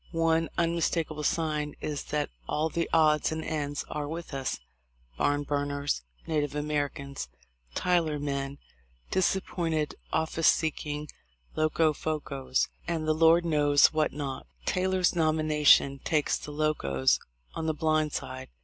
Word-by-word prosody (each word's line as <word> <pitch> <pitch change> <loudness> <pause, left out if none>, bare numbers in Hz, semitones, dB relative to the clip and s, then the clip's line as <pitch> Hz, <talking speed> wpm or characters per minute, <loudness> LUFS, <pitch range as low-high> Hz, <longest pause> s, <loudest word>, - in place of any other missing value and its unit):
One 165 0 +2
un 170 0 +2
mistakable 165 -2 -1
sign 150 -2 0
is 150 -2 -4
that 150 0 -2 0.2
all 155 +2 +1
the 170 +1 -2
odds 155 -2 +4
and 160 0 -3
ends 145 -2 -2
are 150 -1 -4
with 165 0 -6
us 135 -1 -2 0.3
— - - -34
Barn 145 0 +2
burners, 145 - -1 0.2
Native 150 -2 -1
Americans, 145 - -2 0.5
Tyler 170 -4 +1
men, 140 -1 -3 0.5
disappointed 170 -4 0 0.2
office 160 0 +1
seeking 150 -1 +1 0.5
Locofocos, 150 -4 0 0.2
and 165 -2 -1
the 155 - +4
Lord 165 +2 +5
knows 145 -3 +4
what 155 -1 +2
not... 140 -3 -5 0.2
Taylor's 185 -1 +1
nomination 155 -3 +4
takes 155 -3 +1
the - - -7
Locos 145 - +1 0.3
on 160 - -3
the 160 - +2
blind 155 -1 +1
side. 130 -1 -5
150 Hz, 130 wpm, -28 LUFS, 145-160 Hz, 0.5 s, Lord